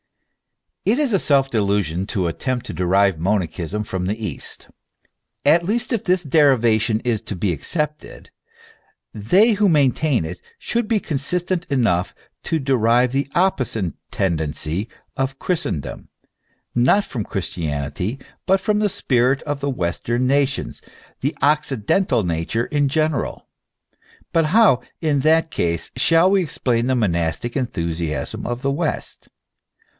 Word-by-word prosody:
It 220 +5 +2
is 285 -6 +1
a 195 - +4
self 135 -4 +2
delusion 100 -4 0
to 95 -5 -1
attempt 125 +8 -2
to - - -6
derive 90 +1 +2
monachism 95 +1 -1
from 95 -3 -3
the 105 +3 -1
east. 105 -11 -5 0.8
At 170 +1 +5
least, 235 +7 -1
if 225 - -1
this 180 -1 +1
derivation 120 -7 +3
is 115 -3 -1
to 105 - -6
be 90 0 0
accepted, 150 - -4 0.8
they 185 - +4
who 205 -1 +3
maintain 145 - +2
it 90 +4 -7 0.2
should 235 -2 -2
be 225 -2 +2
consistent 175 +4 -2
enough 105 - +1 0.3
to 165 - 0
derive 125 -3 +2
the 135 +1 0
opposite 130 - +1 0.2
tendency 80 +1 -1 0.3
of 135 0 -2
Christendom, 165 - -3 0.6
not 130 +12 +3
from. 110 -6 -4
Christianity, 85 - -3 0.3
but 190 +1 +4
from 210 +2 0
the 210 -1 +2
spirit 130 -8 +1
of 145 -2 -3
the 140 0 -2
western 120 +3 -1
nations, 140 +1 0 0.4
the 140 +4 -2
occidental 145 - +2
nature 85 +7 -1
in 145 -1 +1
general. 155 -1 -1 0.9
But 165 -1 +3
how, 190 - +4 0.2
in 150 -4 +1
that 160 +3 +3
case, 85 -1 -2
shall 165 +8 +4
we 195 -1 +4
explain 125 -7 -1
the 130 - +2
monastic 90 +1 -1
enthusiasm 85 - -3
of 120 +2 -4
the 140 - +1
west 155 +2 -3
125 Hz, 135 wpm, -21 LUFS, 100-155 Hz, 0.9 s, At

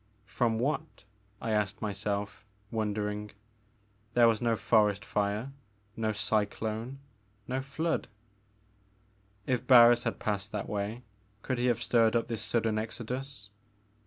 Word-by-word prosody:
From 115 -1 0
what?" 150 +1 -2 0.4
I 115 - -3
asked 105 -1 0
myself, 100 -1 -3 0.3
wondering. 105 -1 -2 0.9
There 120 -1 +7
was 115 -2 +2
no 115 -1 +2
forest 105 -3 +2
fire, 105 +5 -1 0.4
no 110 -1 0
cyclone, 110 +3 -1 0.5
no 130 +1 -1
flood. 155 +5 -2 1.4
If 125 -3 -1
Barris 120 -2 +8
had 115 -2 -2
passed 105 0 -2
that 105 -2 -3
way 105 +4 -3 0.4
could 130 -2 -1
he 125 - +2
have 120 -1 +1
stirred 115 0 +3
up 115 0 +1
this 115 -2 -3
sudden 115 -2 +1
exodus? 120 0 -5
110 Hz, 125 wpm, -30 LUFS, 105-120 Hz, 1.4 s, Barris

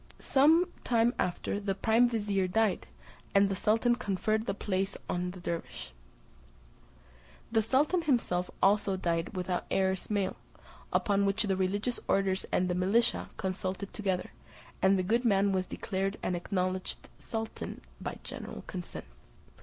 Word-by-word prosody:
Some 320 +6 +4 0.2
time 235 0 +3
after 180 +3 -1
the 200 -1 -1
prime 225 +4 +4
vizier 205 -5 0
died, 215 +1 +1 0.5
and 200 0 +6
the 195 - -1
sultan 225 +5 +3
conferred 220 0 -1
the - - 0
place 195 -1 -1
on 180 0 -1
the 180 +1 -8
dervise. 170 - -5 1.6
The 225 -1 +4
sultan 290 - +2
himself 235 - +1
also 200 -1 +3
died 170 +1 -1
without 180 -1 -2
heirs 190 -1 0
male; 200 -3 0 0.5
upon 200 -1 +2
which 200 +3 +1
the 195 -2 +1
religious 200 +6 0
orders 190 -1 +1
and 180 - +2
the 180 - 0
militia 195 +6 +2
consulted 190 0 -3
together, 190 -4 -2 0.5
and 190 +1 +5
the 185 - +1
good 230 +6 +2
man 200 -3 +3
was 185 -1 0
declared 195 +1 -2
and 180 - 0
acknowledged 185 +1 -2
sultan 225 -1 -5 0.2
by - - -4
general - - -7
consent. 180 -2 -7
195 Hz, 140 wpm, -30 LUFS, 185-220 Hz, 1.6 s, and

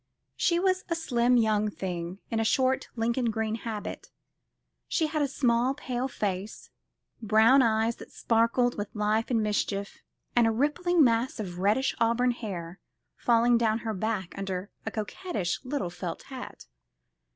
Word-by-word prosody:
She 340 -1 +2
was 370 0 +1
a 335 - +1
slim 250 -6 +2
young 215 -2 +2
thing, 180 -2 -5
in 225 - 0
a - - +2
short 260 +4 +2
Lincoln 235 +1 0
green 220 0 -1
habit. 220 -2 -5 0.8
She 325 - +1
had 305 0 -1
a 285 - +2
small 255 -1 +1
pale 255 -2 -3
face, 200 -4 -4 0.5
brown 220 +5 +5
eyes 225 -1 +2
that - - -12
sparkled 235 +1 +1
with 205 +1 -5
life 215 +1 +1
and 230 -3 +2
mischief, 200 -1 -2 0.4
and 240 -2 +5
a - - +3
rippling 300 +7 +2
mass 235 0 +1
of 180 -4 -5
reddish 210 +8 +2
auburn 235 +2 +3
hair 190 -7 -6 0.4
falling 235 0 +3
down 220 -2 +2
her 220 - -1
back 210 -2 -3
under 195 0 -4 0.2
a - - +2
coquettish 215 - -3
little 255 -9 -3
felt - - -6
hat. - - -9
230 Hz, 150 wpm, -28 LUFS, 210-255 Hz, 0.8 s, brown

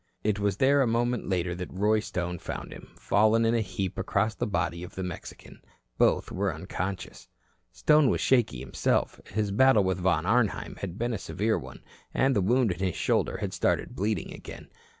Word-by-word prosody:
It 105 -1 0
was 100 -2 0
there 140 +3 +4
a 130 - +3
moment 120 0 0
later 90 -2 0
that 90 +1 -6
Roy 105 +3 +2
Stone 90 -4 -3
found - - -6
him, - - -12
fallen 110 +2 +3
in 115 - +3
a 115 - +2
heap 95 -3 -4
across 110 +2 0
the - - -3
body 85 -3 -1
of 90 - -9
the 95 - -3
Mexican. 90 -2 -8 0.4
Both - - +3
were - - 0
unconscious. 95 +1 -5 0.4
Stone 150 +8 +4
was - - +1
shaky 120 - +2
himself. - - -1
His 105 -1 -1
battle 130 0 +5
with 95 -1 0
Von 85 -3 +1
Arnheim 110 +2 +1
had 95 -2 -6
been 120 +1 -1
a 110 - -3
severe 110 +3 -1
one, - - -11 0.3
and 135 0 +3
the 100 - +3
wound 120 +3 +2
in 85 - -5
his 95 -2 -1
shoulder - - 0
had - - -4
started - - 0
bleeding 105 -3 -2
again. - - -10
100 Hz, 190 wpm, -28 LUFS, 90-115 Hz, 0.4 s, battle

